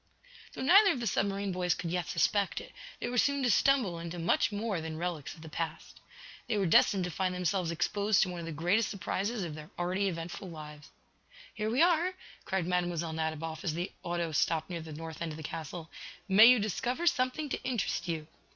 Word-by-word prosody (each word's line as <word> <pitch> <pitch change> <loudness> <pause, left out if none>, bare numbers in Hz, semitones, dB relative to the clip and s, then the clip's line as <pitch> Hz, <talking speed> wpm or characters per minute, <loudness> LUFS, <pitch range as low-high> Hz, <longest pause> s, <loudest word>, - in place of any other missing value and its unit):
Though - - -5
neither 390 +6 +7
of 255 - -4
the 235 - -3
submarine 200 -1 0
boys 180 -1 +1
could 170 - -4
yet 180 -1 -1
suspect 200 +4 +1
it, - - -11 0.3
they - - -3
were 245 0 +1
soon 280 +1 +2
to 245 - +3
stumble 240 -13 +3
into 170 +1 -6
much 170 +4 +2
more 205 -4 -2
than 160 0 -5
relics 170 -4 -4
of 160 - -14
the - - -9
past. 160 0 -5 0.5
They 215 - 0
were 195 - +1
destined 185 +3 +4
to 180 - -3
find 185 +1 -1
themselves 180 -1 0
exposed 200 +5 +2
to 190 - -2
one 175 -1 -5
of 165 - -6
the - - -4
greatest 175 +8 +1
surprises 205 +2 -2
of 165 -3 -4
their 150 0 -9
already 185 +3 0
eventful 175 +2 -5
lives. 150 -2 -10 0.6
"Here 215 0 -2
we 250 +8 +4
are," 350 +1 +3 0.3
cried 190 -3 -1
Mlle. 175 -2 -1
Nadiboff, 160 0 -3
as 160 -4 -1
the 175 +3 -3
auto 170 -1 -2
stopped 160 +3 0
near 170 -1 -3
the 160 0 -9
north 160 +1 -7
end 165 -2 -3
of - - -8
the 160 - -8
castle. 160 +1 -6 0.4
"May 205 +3 +8
you 250 0 +8
discover 245 - -1
something 275 -1 +1
to - - -3
interest 240 -8 -2
you!" 160 -2 -2
180 Hz, 210 wpm, -31 LUFS, 165-215 Hz, 0.6 s, May